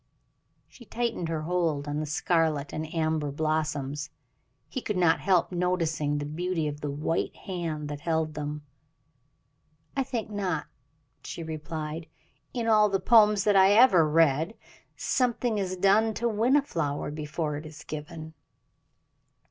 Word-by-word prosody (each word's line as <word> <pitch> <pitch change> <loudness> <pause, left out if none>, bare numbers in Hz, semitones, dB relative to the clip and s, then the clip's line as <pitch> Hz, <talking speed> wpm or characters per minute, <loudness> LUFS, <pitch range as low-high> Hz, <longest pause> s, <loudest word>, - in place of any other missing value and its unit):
She 250 - -16
tightened 230 -7 -2
her 160 -2 -2
hold 165 -4 0
on 145 +1 -2
the 155 - -3
scarlet 155 -2 0
and 155 0 -4
amber 160 -2 0
blossoms. 150 -1 -2 0.6
He 260 - -5
could 210 -4 -2
not 175 -3 +4
help 185 -3 +2
noticing 165 -5 0
the 145 - -3
beauty 165 +1 -2
of 145 0 -5
the 145 - -3
white 150 +4 -2
hand 165 -5 -4
that 145 -1 -5
held 160 -1 0
them. 150 0 -5 1.3
"I 275 - +1
think 240 -5 -3
not," 185 -7 -2 0.6
she 170 - -6
replied. 155 0 -5 0.4
"In 235 -2 -3
all 215 -2 +5
the 195 -1 +1
poems 210 -1 +5
that 205 -1 +3
I 195 +1 +6
ever 195 -9 +6
read 160 +5 +3 0.4
something 245 -3 0
is 185 -1 -2
done 210 +4 +3
to 235 - 0
win 230 +4 +2
a 290 - +4
flower 150 - -2
before 150 0 -3
it 150 - -8
is 155 -1 -11
given." 155 +1 -7
165 Hz, 150 wpm, -27 LUFS, 150-200 Hz, 1.3 s, I